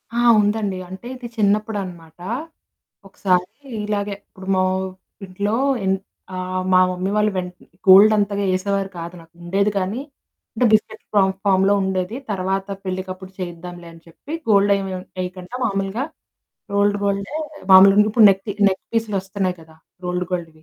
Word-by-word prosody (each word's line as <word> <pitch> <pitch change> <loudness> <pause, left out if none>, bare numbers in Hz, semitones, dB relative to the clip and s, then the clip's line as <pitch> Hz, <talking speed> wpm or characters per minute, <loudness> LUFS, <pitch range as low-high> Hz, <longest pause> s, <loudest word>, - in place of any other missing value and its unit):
ఆ! - - +1 0.2
ఉందండి. 205 -2 0
అంటే 190 +6 -9
ఇది 245 -1 -8
చిన్నప్పుడునమాట. 200 -6 -1 0.9
ఒకసారి 185 0 0 0.3
ఇలాగే 205 -1 -2
ఇప్పుడు 190 0 -13
మా 185 - +3 0.6
ఇంట్లో 200 +4 -2 0.3
ఎన్ 190 0 +2 0.4
ఆహ్, 185 0 -3
మా 185 - +7
మమ్మీ 185 +2 -2
వాళ్ళు 210 0 +3
వెంట 180 -1 -3 0.3
గోల్డ్ 200 +3 +9
అంతగా 200 -1 0
ఏసేవారు 195 +1 -1
కాదు 170 +1 -6
నాకు, 165 0 -19
ఉండేదు 200 +4 +1
కానీ. 195 +7 -2 0.5
అంటే 245 - +1
బిస్కెట్ 215 - +1 0.4
ఫామ్‌లో 195 +1 +4
ఉండేది. 190 +4 -2
తర్వాత 190 0 -1 0.2
పెళ్ళకప్పుడు 185 0 -5
చేయిద్దాంలే 175 -1 -7
అని 165 - -15
చెప్పి 280 - -12 0.2
గోల్డ్ 200 -1 +5
ఏం 195 -1 -3 0.4
ఎయ్యకండా 180 +6 -7
మామూలుగా, 195 +4 -1 0.7
రోల్డ్ 205 0 +3
గోల్డే 200 +8 -1 0.4
మామూలుగా 195 +2 +8
ఇప్పుడు 220 -1 +7
నెక్‌పీ 195 +2 -2 0.2
నెక్‌పీస్లొస్తున్నాయి 195 -2 -2
కదా! 160 0 -17 0.3
రోల్డ్ 180 0 -2
గోల్డ్‌వి. 165 -3 -5
195 Hz, 130 wpm, -21 LUFS, 185-205 Hz, 0.9 s, గోల్డ్